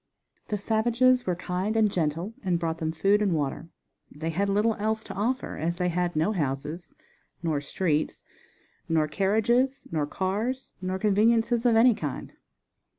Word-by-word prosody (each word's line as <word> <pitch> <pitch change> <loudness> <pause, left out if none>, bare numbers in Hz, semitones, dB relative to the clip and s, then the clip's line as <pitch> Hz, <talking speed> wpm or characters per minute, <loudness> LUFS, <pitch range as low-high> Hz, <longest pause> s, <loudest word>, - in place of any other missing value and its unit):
The 210 - -1
savages 240 +4 +2
were 180 - +1
kind 185 +5 -2
and 215 -2 +3
gentle 170 +4 -1
and 185 -4 +1
brought 165 -1 -2
them 160 -2 -1
food 195 +6 +2
and 200 -4 +2
water. 145 +2 -3 0.4
They 160 +3 -4
had 200 +5 0
little 210 +3 +2
else 220 +1 -1
to - - -8
offer 245 +6 -2
as 165 +3 -1
they 180 0 0
had 175 0 -1
no 160 +7 +2
houses, 150 -1 -3 0.5
nor 155 -4 0
streets, 155 +1 -1 0.7
nor 160 -2 +2
carriages, 220 - +1
nor 155 -3 0
cars, 210 - -2
nor 185 0 -2
conveniences 225 +4 +3
of 235 - +4
any 235 +2 +6
kind. 150 -9 -5
190 Hz, 155 wpm, -27 LUFS, 165-220 Hz, 0.7 s, any